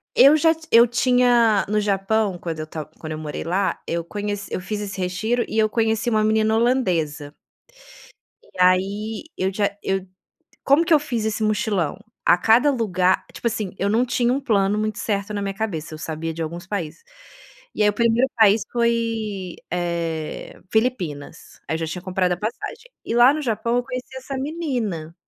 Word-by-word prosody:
Eu 280 +3 +8
já 325 +1 +4
ti 320 0 -16
eu 235 +1 +7
tinha 240 -3 +3
no 215 0 +2
Japão 200 -1 0
quando 165 -2 -5
eu 155 - -5
ta 155 -1 -5
quando 155 - -7
eu 155 - -5
morei 150 -1 -5
lá, 190 +3 0
eu 170 0 -2
conhe 205 +4 -4 0.2
eu - - -3
fiz 210 +3 -4
esse 200 -1 -6
retiro 200 +7 -1
e 220 - -4
eu 215 - +3
conheci 225 +1 0
uma 215 -1 +2
menina 220 0 +2
holandesa 175 - 0 1.1
e - - -23
aí 200 +5 +1
eu 190 +1 -1
já 200 0 0
eu 190 -1 -1 0.6
como 290 +5 +4
que 330 - +4
eu 300 - +6
fiz 240 -7 -3
esse 220 0 -1
mochilão? 210 -7 0 0.3
A - - +6
cada 230 +9 +4
lugar, 185 -7 +1
tipo - - -7
assim 215 -5 -3
eu 200 - 0
não 235 +3 +3
tinha 240 0 +1
um 275 - 0
plano 205 -5 +1
muito 215 0 -2
certo 205 0 -2
na 205 - -2
minha 195 -1 -3
cabeça, 170 -8 -4
eu 155 - -8
sabia 160 +1 -4
de 165 - -4
alguns 170 +3 -6
países. 185 - -4 0.7
E - - 0
aí 210 - +5
o - - +2
primeiro 235 +4 +2
país 215 -1 +5
foi, 225 -5 -1
eh, 170 -3 -3
Filipinas, 185 - -2
aí - - 0
eu - - -1
já 165 - -1
tinha 175 +3 -5
comprado 185 0 0
a - - 0
passagem. 240 - -5 0.2
E - - -3
lá 245 +4 +7
no 310 - -3
Japão 235 -1 -1
eu 245 - +2
conheci 255 0 -6
essa 265 +1 -6
menina, 250 - -3
210 Hz, 190 wpm, -22 LUFS, 180-235 Hz, 1.1 s, Eu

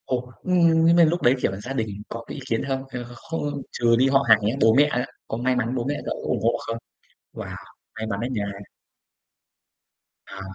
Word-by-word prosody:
Ồ, 125 -1 -2
nhưng 170 -3 +4
nhưng 170 +1 +6
mà 170 - +7
lúc 170 +2 +2
đấy, 125 +2 +5
kiểu, - - +1
gia 130 +5 -5
đình 115 -5 -1 0.2
có 115 0 -6
cái - - -7
ý 140 - -7
kiến 115 - 0
không? 135 -1 -1
Hay 125 -2 -5
là 120 - -8
kh 120 - -12
không 145 0 -4
trừ 120 -1 +3
đi 130 +3 +4
họ 135 0 +5
hàng 110 -1 +8
nhé, 105 +5 0
bố 110 0 +6
mẹ 145 - +8
á, 125 -4 -1 0.2
có 110 - -3
may 125 +2 +1
mắn 125 0 -1
bố 120 - -1
mẹ 145 - 0
cậu - - -2
có - - -5
ủng - - +1
hộ - - +2
không? 115 - -2 0.6
Wow, - - -7 0.4
may 110 - -4
mắn 100 -2 -2
á 120 - -1
nha. 105 -5 -1 1.8
À. 95 - -9
125 Hz, 240 wpm, -24 LUFS, 115-145 Hz, 1.8 s, hàng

